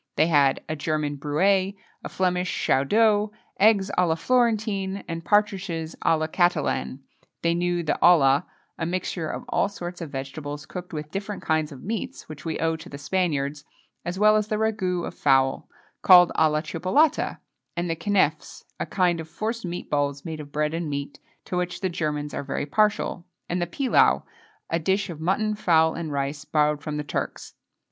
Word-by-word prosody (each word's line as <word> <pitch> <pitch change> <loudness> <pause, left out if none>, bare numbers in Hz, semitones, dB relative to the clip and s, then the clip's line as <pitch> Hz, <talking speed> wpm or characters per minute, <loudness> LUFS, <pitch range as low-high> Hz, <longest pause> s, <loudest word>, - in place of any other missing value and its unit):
They 155 - +4
had 145 -5 +3
a 155 - -2
German 150 -1 -2
brouet, 185 +7 +1 0.3
a - - -5
Flemish 180 -1 0
chaudeau, 210 +9 +2 0.3
eggs 200 -1 +4
à 180 - +4
la 160 - +2
Florentine, 210 -2 0
and 165 0 -5
partridges 195 -6 0
à 165 - +4
la 155 - -1
Catalane. 160 -5 0 0.4
They 170 0 +3
knew 175 0 0
the 155 - -1
olla 145 -3 +5 0.3
a 165 - -1
mixture 175 -2 -2
of - - -5
all - - +1
sorts 175 -3 -7
of 165 - -5
vegetables 145 +2 -6
cooked 180 +3 -8
with 150 -2 -6
different 200 +1 -5
kinds 155 -1 0
of 135 -3 -11
meats, 220 0 -5
which 155 -2 -10
we 160 - -2
owe 160 0 0
to 160 - -11
the 140 - -8
Spaniards, 145 -3 -1 0.4
as 175 +2 -4
well 215 +1 +5
as 215 -1 0
the 215 - -1
ragoût 205 -5 0
of - - -6
fowl, 135 -1 +2 0.3
called 180 -2 +8
à 155 -1 +4
la 150 0 +1
Chipolata, 185 - +1 0.4
and 175 +1 -1
the 165 - -1
keneffes 175 -5 0 0.2
a - - -2
kind 180 -3 +1
of 160 0 -7
forced 225 +4 -3
meat 175 0 -5
balls 145 0 0
made 160 -2 -5
of 145 -1 -9
bread 150 +1 0
and 165 -1 -2
meat, 140 0 -5 0.3
to - - -4
which 180 0 -2
the 190 - 0
Germans 150 -4 -3
are - - -2
very 140 +1 -3
partial, 205 0 0 0.2
and 175 +1 -1
the 175 - 0
pilau 260 - +3 0.4
a 165 - 0
dish 190 +3 0
of 160 -2 -9
mutton, 210 +5 +1
fowl, 160 -6 +3
and 165 -2 -5
rice, 140 +1 -2
borrowed 150 -1 +1
from 150 0 -4
the 150 - -2
Turks. 145 - -4
170 Hz, 185 wpm, -25 LUFS, 150-190 Hz, 0.4 s, called